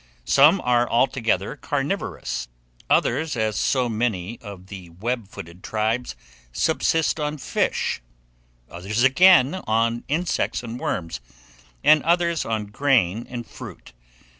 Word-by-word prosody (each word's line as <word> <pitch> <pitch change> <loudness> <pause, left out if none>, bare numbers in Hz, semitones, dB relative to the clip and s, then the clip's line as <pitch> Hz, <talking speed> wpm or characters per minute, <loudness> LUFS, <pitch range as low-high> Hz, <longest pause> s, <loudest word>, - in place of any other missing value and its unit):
Some 150 - +5
are 120 -1 +2
altogether 115 -5 +1
carnivorous; 135 - -3 0.4
others, 155 -4 +1
as 110 -1 0
so 125 +7 +1
many 110 -2 -2
of 100 -4 -10
the 95 -3 -10
web 110 +6 -4
footed 85 -2 -11
tribes, 110 +3 -2 0.4
subsist 160 - +1
on 150 0 -2
fish; 135 - -1 0.7
others, 100 +7 -2
again, 165 +3 +5
on 115 +2 +1
insects 165 -2 -1
and 120 +1 -6
worms; 85 - -3 0.6
and 155 -1 +6
others 170 -1 +1
on 110 -2 -2
grain 115 -2 +1
and 120 -2 -6
fruit. - - -11
120 Hz, 115 wpm, -23 LUFS, 100-140 Hz, 0.7 s, and